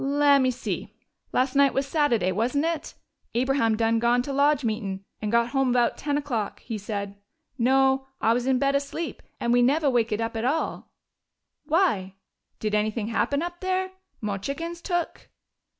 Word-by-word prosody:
"Lem'me 280 -1 +4
see.... 250 0 -4 0.4
Las' 255 +1 +1
night 280 -1 +4
was 270 - +1
Sattiday, 270 - +1
wasn't 250 +9 0
it? 330 -2 -3 0.4
Abraham 240 -3 +2
done 225 0 +2
gone 240 +1 +2
to 275 - -4
lodge 285 0 +3
meetin' 200 -4 -3 0.2
and 210 -1 -2
got 235 0 +3
home 270 -1 +1
bout 240 -1 +2
ten 290 0 -1
o'clock, 240 -8 -3
he 230 - -5
said. 200 -1 -5 0.4
No, 265 +2 +3
I 225 - +3
was 245 +1 -1
in 265 -1 +3
bed 275 +2 +2
asleep, 280 +4 -3 0.2
and 235 0 +1
we 245 - +5
neve' 285 +6 +3
wakened 230 -6 +2
up 230 0 -4
at 225 - -2
all.... 290 +6 -1 0.8
Why? 290 - +1 0.4
Did 215 -1 -2
anything 215 +1 0
happen 280 +6 0
up 350 0 -5
there? 375 0 -1 0.3
Mo' 205 -3 -2
chickens 335 - -5
took?" 350 -2 -3
255 Hz, 165 wpm, -26 LUFS, 225-285 Hz, 0.8 s, we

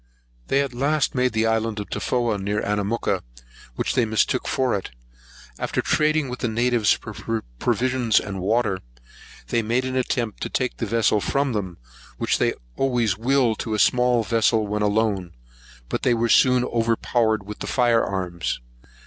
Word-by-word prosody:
They 140 - +2
at 135 -3 -5
last 140 +4 +1
made 125 -1 +1
the 110 0 +1
island 110 -1 0
of 105 - -5
Tofoa, 120 -4 0
near 100 +2 -1
to - - -4
Anamooka, 105 +2 0 0.5
which - - -1
they 125 - +3
mistook 110 +3 +1
for 130 -2 +1
it. 100 - -3 0.7
After - - -2
trading 155 -1 +2
with 125 0 -6
the - - -1
natives 115 -1 +2
for 110 +1 -4 0.2
provisions 125 -3 +2
and 100 -1 -5
water, 105 -1 +1 0.7
they 115 - +1
made 120 +4 0
an 130 0 -3
attempt 120 -3 -1
to - - -2
take 125 -1 -1
the 115 - -3
vessel 110 -1 +2
from 140 +2 0
them, 95 -5 -3 0.4
which - - 0
they - - +1 0.2
always 120 -6 +1
will 125 +2 +2
to 110 -2 -3
a - - -1
small 125 +1 +3
vessel, 110 0 +2
when 105 +1 -2
alone; 105 - 0 0.5
but - - -3
they 120 - +3
were 115 0 0
soon 125 +1 +5
overpowered 115 -2 +1
with 105 +1 -8
the - - -5
fire 120 -3 +3
arms. 90 -3 -3
115 Hz, 170 wpm, -23 LUFS, 105-125 Hz, 0.7 s, soon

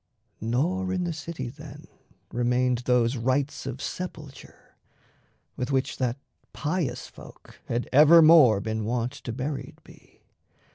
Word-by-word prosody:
Nor 170 - -1
in 185 -1 -1
the 175 -1 -2
city 155 -4 -6
then 120 - -11 0.5
Remained 125 +1 +1
those 125 0 +2
rites 130 +4 -1
of 130 -1 -5
sepulture, 155 -7 -8 0.8
with 125 - -4
which 130 -1 -1
That 125 -1 -1 0.4
pious 155 0 -2
folk - - -15
had 120 +1 -2
evermore 155 -6 +7
been 110 +1 -3
wont 120 +2 -1
To 140 -4 -8
buried 135 +4 -5
be. - - -20
130 Hz, 125 wpm, -26 LUFS, 120-155 Hz, 0.8 s, evermore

